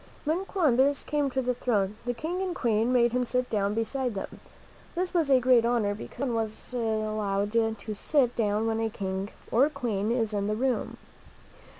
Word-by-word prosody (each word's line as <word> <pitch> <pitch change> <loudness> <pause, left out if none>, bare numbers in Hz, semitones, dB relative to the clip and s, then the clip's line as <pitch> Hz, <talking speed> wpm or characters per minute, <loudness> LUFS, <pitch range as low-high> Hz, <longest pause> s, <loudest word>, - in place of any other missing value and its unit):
When 335 +6 0
Columbus 285 -7 +2
came 295 -2 0
to 265 0 -1
the 250 0 +1
throne, 210 -5 0
the 245 0 -1
King 340 +8 -3
and 370 -2 -2
Queen 230 -2 +1
made 240 -2 +4
him 250 +1 +1
sit 250 +1 -1
down 205 -1 0
beside 245 +1 -1
them. 195 - -6 0.6
This 360 +1 -1
was 330 -5 +2
a 265 -2 +6
great 250 -2 +5
honor, 230 -4 +1
because 230 +5 -7
no 245 - -1
one 225 - +1
is 215 +3 -8
allowed 215 -3 -1 0.3
to 215 - -5
sit 250 +3 +1
down 210 -1 +1
when 225 0 0
a 225 0 0
king 190 -1 -4 0.2
or 265 +6 +4
queen 230 -7 -2
is 225 -3 0
in 200 -1 -1
the 215 - 0
room. 255 +2 -1
235 Hz, 195 wpm, -28 LUFS, 215-265 Hz, 0.6 s, a